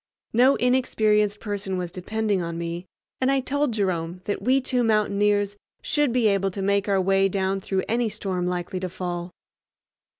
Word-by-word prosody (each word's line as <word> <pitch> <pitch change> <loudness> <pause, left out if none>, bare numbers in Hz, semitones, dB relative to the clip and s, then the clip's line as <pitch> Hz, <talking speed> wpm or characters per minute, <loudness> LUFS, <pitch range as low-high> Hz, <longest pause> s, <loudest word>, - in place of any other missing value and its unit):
No 255 +4 +5
inexperienced 215 -5 +2
person 200 -3 -3
was 180 -1 -4
depending 205 +2 -1
on 170 -1 -4
me, 170 +2 -4 0.3
and 260 - +2
I 275 - +3
told 285 +1 0
Jerome 180 -4 -1
that 205 - -2
we 260 +2 +3
two 250 -1 0
mountaineers 205 -2 +2 0.3
should 295 -4 +1
be 240 -2 +3
able 195 -1 +2
to 195 +1 -6
make 200 +1 +1
our 195 -1 +3
way 195 +1 +3
down 195 0 0
through 190 -1 -1
any 235 0 +1
storm 190 -4 -3
likely 180 +1 -3
to 185 0 -3
fall. 175 -1 -4
200 Hz, 170 wpm, -24 LUFS, 185-220 Hz, 0.3 s, No